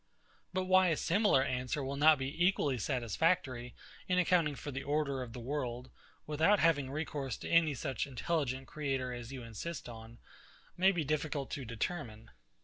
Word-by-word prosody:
But 185 0 -1
why 185 0 +5
a 160 -3 +2
similar 190 -7 +3
answer 130 +2 -2
will 135 +1 -3
not 155 +2 +6
be 140 +6 -2
equally 150 -9 +2
satisfactory 125 - 0 0.3
in 180 - +1
accounting 175 -4 +3
for 145 - -6
the 135 0 -4
order 145 -2 -1
of 125 -2 -6
the 125 - -7
world, 125 -1 -4 0.3
without 160 +7 +3
having 150 -7 +2
recourse 140 -3 -3
to - - -7
any 165 -3 +4
such 130 0 -2
intelligent 135 -1 -2
creator 135 -5 -2
as 120 0 -7
you 130 -3 -7
insist 115 +9 -6
on, 115 0 -10 0.6
may 190 +2 +5
be 175 -4 -1
difficult 150 -1 -2
to 135 - -4
determine. 115 -2 -4
140 Hz, 165 wpm, -33 LUFS, 125-165 Hz, 0.6 s, not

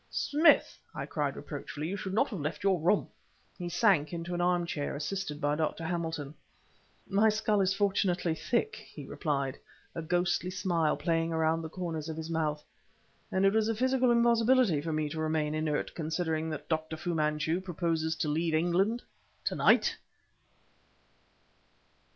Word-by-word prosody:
"Smith!" 305 +4 +3 0.2
I - - -3
cried - - -2
reproachfully 150 +1 -6
"you 190 - -2
should 190 -1 -4
not 270 +6 +3
have 200 - -5
left 150 +3 -4
your 195 -3 +3
room!" 175 +6 +2 0.5
He 175 -1 -3
sank 175 -4 +3
into 170 +1 -4
an 175 - -1
arm 175 0 +2
chair, 145 -4 -3
assisted 150 +1 -3
by 145 -1 +1
Dr. 160 +1 -2
Hamilton. 160 -4 -3 0.7
"My 210 +3 +4
skull 215 -1 +1
is 190 0 +2
fortunately 190 -4 +1
thick!" 215 +5 -1
he 155 -9 -11
replied, 140 -2 -2 0.3
a 165 - -4
ghostly 175 +2 0
smile 175 -4 0
playing 165 +1 0
around 160 0 +1
the 160 - -6
corners 165 -3 -4
of 160 - -5
his 160 +1 -5
mouth 150 -2 -1 0.7
"and 190 +1 +2
it 195 - +4
was 220 -1 +2
a 225 - 0
physical 260 +2 +2
impossibility 235 - +4
for 160 +2 -3
me 155 -1 0
to 155 +2 -5
remain 155 -1 0
inert 155 -1 -1
considering 160 0 -2
that 155 - -6
Dr. 160 0 -2
Fu 175 +2 -3
Manchu 155 +2 0
proposes 165 -3 -1
to 155 - -2
leave 160 +2 0
England 185 +8 +1 0.4
to - - 0
night!" - - +4
165 Hz, 165 wpm, -30 LUFS, 155-190 Hz, 0.7 s, My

